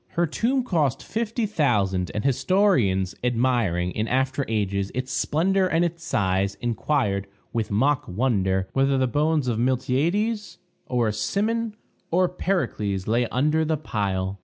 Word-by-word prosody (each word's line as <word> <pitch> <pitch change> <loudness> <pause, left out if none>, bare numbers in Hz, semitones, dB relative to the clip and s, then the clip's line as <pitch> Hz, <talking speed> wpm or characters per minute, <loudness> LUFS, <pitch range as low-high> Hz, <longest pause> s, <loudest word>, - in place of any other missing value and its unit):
Her 175 - +2
tomb 245 - 0
cost 155 - 0
$50,000; 150 - 0
and 105 - -1
historians, 130 - +2
admiring, 115 -8 +1
in 110 +4 -2
after 130 +2 0
ages, 100 -3 -1
its 130 +1 -3
splendor 185 +8 +1
and 170 0 +2
its 170 0 -4
size, 100 - 0
inquired, 115 -4 0 0.3
with 115 -2 -1
mock 130 +7 +1
wonder, 95 -3 0
whether 135 0 +2
the 130 - +2
bones 150 +2 +1
of 115 -2 0
a - - +1
Miltiades, 165 - 0 0.3
or 120 -3 +1
a - - -2
Cimon, 220 - -1 0.3
or 185 +2 +3
a - - -1
Pericles 115 - -1
lay 120 +2 +1
under 150 +7 +1
the 160 0 0
pile! 100 -8 -2
130 Hz, 145 wpm, -24 LUFS, 105-170 Hz, 0.3 s, or